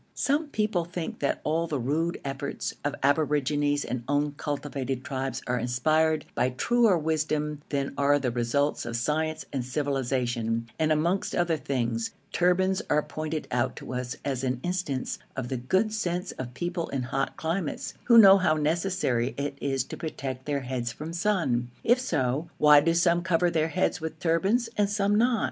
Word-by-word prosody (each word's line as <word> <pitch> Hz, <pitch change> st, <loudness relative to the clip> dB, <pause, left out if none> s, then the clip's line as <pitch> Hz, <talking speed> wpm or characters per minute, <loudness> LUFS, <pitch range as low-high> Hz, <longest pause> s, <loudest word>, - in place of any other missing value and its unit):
Some 295 Hz, +3 st, +1 dB
people 210 Hz, -9 st, 0 dB
think 175 Hz, -1 st, -5 dB
that 140 Hz, -, -1 dB
all 165 Hz, +2 st, 0 dB
the 155 Hz, -3 st, -1 dB
rude 155 Hz, +7 st, -1 dB
efforts 140 Hz, +1 st, -3 dB
of 145 Hz, 0 st, -1 dB
aborigines 145 Hz, 0 st, +2 dB
and 125 Hz, -1 st, -3 dB
uncultivated 145 Hz, -2 st, -2 dB
tribes 135 Hz, -3 st, -3 dB
are 125 Hz, 0 st, 0 dB
inspired 155 Hz, +7 st, +1 dB
by 125 Hz, -, +1 dB
truer 225 Hz, -, +3 dB
wisdom 155 Hz, -1 st, -1 dB
than 140 Hz, -1 st, -1 dB
are 145 Hz, +1 st, +4 dB
the 130 Hz, -4 st, -1 dB
results 120 Hz, +5 st, 0 dB
of 115 Hz, 0 st, -4 dB
science 155 Hz, +6 st, -1 dB
and 135 Hz, -3 st, -1 dB
civilisation, 125 Hz, -4 st, -1 dB
and 155 Hz, 0 st, +2 dB
amongst 170 Hz, +5 st, +1 dB
other 175 Hz, -2 st, +2 dB
things, 120 Hz, -6 st, -2 dB, 0.2 s
turbans 185 Hz, +2 st, +2 dB
are 150 Hz, 0 st, +3 dB
pointed 155 Hz, 0 st, -4 dB
out 125 Hz, +1 st, 0 dB
to -, -, -7 dB
us 125 Hz, 0 st, -3 dB
as 135 Hz, -2 st, -2 dB
an 125 Hz, -1 st, -1 dB
instance 175 Hz, -7 st, -2 dB, 0.2 s
of 130 Hz, -2 st, -4 dB
the 130 Hz, -, -2 dB
good 190 Hz, -, +1 dB
sense 180 Hz, -3 st, -2 dB
of 125 Hz, -1 st, -7 dB
people 175 Hz, +3 st, -2 dB
in 135 Hz, -2 st, -2 dB
hot 135 Hz, +2 st, -2 dB
climates, 165 Hz, 0 st, -2 dB
who 235 Hz, -1 st, +6 dB
know 195 Hz, -3 st, +9 dB
how 170 Hz, -4 st, +3 dB
necessary 155 Hz, -6 st, 0 dB
it 140 Hz, 0 st, -2 dB
is 135 Hz, -2 st, 0 dB
to -, -, -8 dB
protect 135 Hz, -5 st, -5 dB
their 140 Hz, -1 st, 0 dB
heads 125 Hz, -2 st, -3 dB
from 150 Hz, +6 st, -7 dB
the 170 Hz, -, -4 dB
sun. 165 Hz, -13 st, +1 dB
If 240 Hz, +2 st, +4 dB
so, 145 Hz, -, -1 dB
why 150 Hz, -1 st, +7 dB
do 165 Hz, +2 st, +2 dB
some 170 Hz, 0 st, +3 dB
cover 175 Hz, 0 st, +2 dB
their 160 Hz, -1 st, +1 dB
heads 180 Hz, 0 st, 0 dB
with 160 Hz, 0 st, -5 dB
turbans 190 Hz, +9 st, +2 dB
and 205 Hz, -1 st, +2 dB
some 205 Hz, 0 st, +1 dB
not? 230 Hz, +2 st, +3 dB
150 Hz, 175 wpm, -27 LUFS, 130-175 Hz, 0.2 s, know